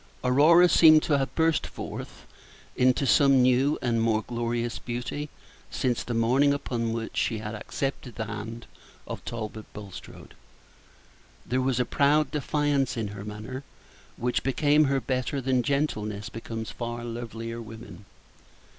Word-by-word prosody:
Aurora 155 Hz, +8 st, +6 dB
seemed 155 Hz, -3 st, +7 dB
to 145 Hz, -3 st, +2 dB
have 135 Hz, -, -3 dB
burst 160 Hz, -1 st, +2 dB
forth -, -, -8 dB, 0.5 s
into 130 Hz, +2 st, +3 dB
some 135 Hz, -1 st, +5 dB
new 130 Hz, +4 st, +3 dB
and 115 Hz, -2 st, +1 dB
more 110 Hz, -1 st, +1 dB
glorious 120 Hz, 0 st, -2 dB
beauty 125 Hz, +5 st, -4 dB, 0.4 s
since 125 Hz, -3 st, -1 dB
the 120 Hz, -, -4 dB
morning 130 Hz, +5 st, +3 dB
upon 115 Hz, -5 st, -2 dB
which 115 Hz, -1 st, -4 dB
she 115 Hz, -, 0 dB
had 105 Hz, 0 st, -5 dB
accepted 125 Hz, +2 st, -4 dB
the 110 Hz, -, -3 dB
hand 115 Hz, +2 st, -6 dB, 0.4 s
of -, -, -7 dB
Talbot 110 Hz, -2 st, -6 dB
Bulstrode. 100 Hz, -3 st, -10 dB, 1.1 s
There 130 Hz, +2 st, 0 dB
was 130 Hz, -1 st, 0 dB
a 125 Hz, -, +2 dB
proud 145 Hz, +2 st, +2 dB
defiance 145 Hz, -3 st, 0 dB
in 110 Hz, -3 st, -2 dB
her 100 Hz, 0 st, -8 dB
manner, 110 Hz, +6 st, -7 dB, 0.5 s
which 125 Hz, +1 st, 0 dB
became 145 Hz, +3 st, +3 dB
her 135 Hz, -1 st, +1 dB
better 130 Hz, +2 st, -2 dB
than 130 Hz, -1 st, +1 dB
gentleness 110 Hz, -7 st, -1 dB
becomes 115 Hz, 0 st, -6 dB
far 120 Hz, 0 st, -5 dB
lovelier 115 Hz, 0 st, -6 dB
women. 110 Hz, -2 st, -11 dB
125 Hz, 140 wpm, -27 LUFS, 115-140 Hz, 1.1 s, seemed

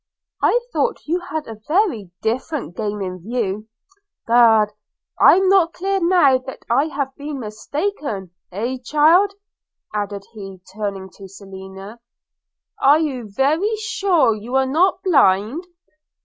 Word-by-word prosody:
I 485 Hz, -, +3 dB
thought 475 Hz, -, -1 dB
you 340 Hz, +4 st, 0 dB
had 315 Hz, -3 st, -5 dB
a 220 Hz, -2 st, -9 dB
very 310 Hz, -, +1 dB
different 245 Hz, -, -3 dB
game 210 Hz, -2 st, -3 dB
in 185 Hz, -1 st, -5 dB
view 215 Hz, -1 st, -3 dB, 0.3 s
– 405 Hz, 0 st, -49 dB
Egad, 225 Hz, -3 st, +5 dB, 0.5 s
I'm 380 Hz, +1 st, +6 dB
not 370 Hz, -3 st, +4 dB
clear 390 Hz, +2 st, -1 dB
now 340 Hz, -7 st, +4 dB
that 260 Hz, +1 st, -10 dB
I 275 Hz, +5 st, +3 dB
have 280 Hz, -4 st, -4 dB
been 290 Hz, -1 st, -6 dB
mistaken 225 Hz, -, -4 dB
– -, -, -55 dB
Heh, 235 Hz, +8 st, -3 dB
child!' 330 Hz, +9 st, +4 dB, 0.6 s
added 205 Hz, -1 st, -3 dB
he 195 Hz, -3 st, -9 dB
turning 195 Hz, -2 st, -5 dB
to 195 Hz, -, -10 dB
Selina, 195 Hz, +2 st, -11 dB, 0.8 s
'are 285 Hz, +3 st, +6 dB
you 265 Hz, -8 st, -3 dB
very 310 Hz, -, +1 dB
sure 390 Hz, -, +1 dB
you 220 Hz, +5 st, -6 dB
are 265 Hz, 0 st, +3 dB
not 335 Hz, +8 st, +2 dB
a -, -, -32 dB
blind? 260 Hz, -, +3 dB
260 Hz, 140 wpm, -20 LUFS, 210-330 Hz, 0.8 s, I'm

